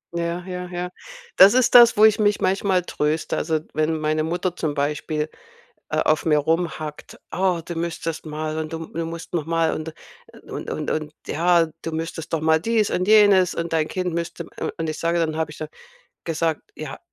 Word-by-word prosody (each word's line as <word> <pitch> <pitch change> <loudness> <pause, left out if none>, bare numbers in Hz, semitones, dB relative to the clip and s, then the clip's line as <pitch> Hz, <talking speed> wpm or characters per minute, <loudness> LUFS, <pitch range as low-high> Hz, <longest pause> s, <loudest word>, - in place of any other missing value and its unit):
Ja, 170 +1 -2
ja, 180 -1 -5
ja. 180 0 -4 0.5
Das 200 +5 +8
ist 255 -2 +3
das, 240 -2 +8
wo 215 - +8
ich 220 0 +4
mich 205 -1 +2
manchmal 190 -1 +1
tröste. 155 -1 -1
Also, 160 -1 0
wenn 155 +1 0
meine 155 0 0
Mutter 175 +2 -2
zum 155 -4 -2
Beispiel, 150 +1 -1 0.6
äh, - - -1
auf 155 0 +2
mir 150 -2 +4
rumhackt: 155 -1 -2
„Oh, 185 -2 +1
du 170 - -6
müsstest 165 -1 -4
mal 155 0 -4
und 155 -1 -4
du 165 0 -5
du 165 0 -4
musst 165 0 -8
noch 165 -4 -1
mal 165 0 +1
und 155 0 -5 0.5
und - - -7
und - - -3
und 155 -1 -3
ja, 170 +1 +3
du 165 - -4
müsstest 165 0 -5
doch 165 - +1
mal 160 0 +3
dies 225 0 +1
und 185 +3 -1
jenes 205 -4 +6
und 170 0 -3
dein 155 -1 +1
Kind 180 -2 -2
müsste“, 170 0 -4 0.2
u - - -1
und 160 -1 -2
ich 155 - -5
sage 170 +1 +1
dann 160 -2 0
habe 160 -1 -2
ich 150 - -11
dann 155 - -5 0.6
gesagt: 165 -1 -1
„Ja, 150 -3 -7
165 Hz, 200 wpm, -23 LUFS, 155-180 Hz, 0.6 s, Das